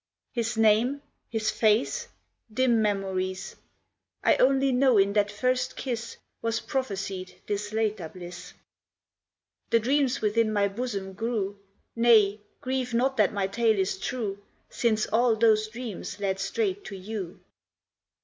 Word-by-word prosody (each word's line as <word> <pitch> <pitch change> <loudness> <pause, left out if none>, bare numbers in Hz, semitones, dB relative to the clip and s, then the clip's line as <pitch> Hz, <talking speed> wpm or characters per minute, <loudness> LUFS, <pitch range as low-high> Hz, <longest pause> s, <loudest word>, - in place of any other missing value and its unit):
His 235 -1 -2
name? 225 +6 +3 0.3
his 220 -1 0
face? 220 +2 +1 0.4
dim 235 0 +3
memories; 190 -2 -2 0.7
I - - +5
only 270 +1 +3
know 255 -2 +4
in 200 0 +4
that 205 -1 +2
first 255 +4 0
kiss 235 -3 -4 0.2
Was 230 0 0
prophesied 195 -7 -4
this 205 0 -3
later 215 -6 -1
bliss. 175 0 -10 1.2
The 230 - +5
dreams 265 +2 +1
within 215 +1 +2
my 200 -1 +2
bosom 200 -3 -4
grew; 205 -2 -2 0.4
Nay, 220 -3 +5 0.2
grieve 255 -3 -2
not 265 +3 +2
that 210 -3 +4
my 200 -2 -1
tale 220 +2 +2
is 190 0 0
true, 205 -4 -3 0.3
Since 220 -2 +1
all 230 +1 +3
those 215 -1 +3
dreams 220 -4 -7
led 195 -1 -1
straight 400 - -1
to 200 - -7
you. 190 -2 -6
220 Hz, 130 wpm, -27 LUFS, 200-245 Hz, 1.2 s, I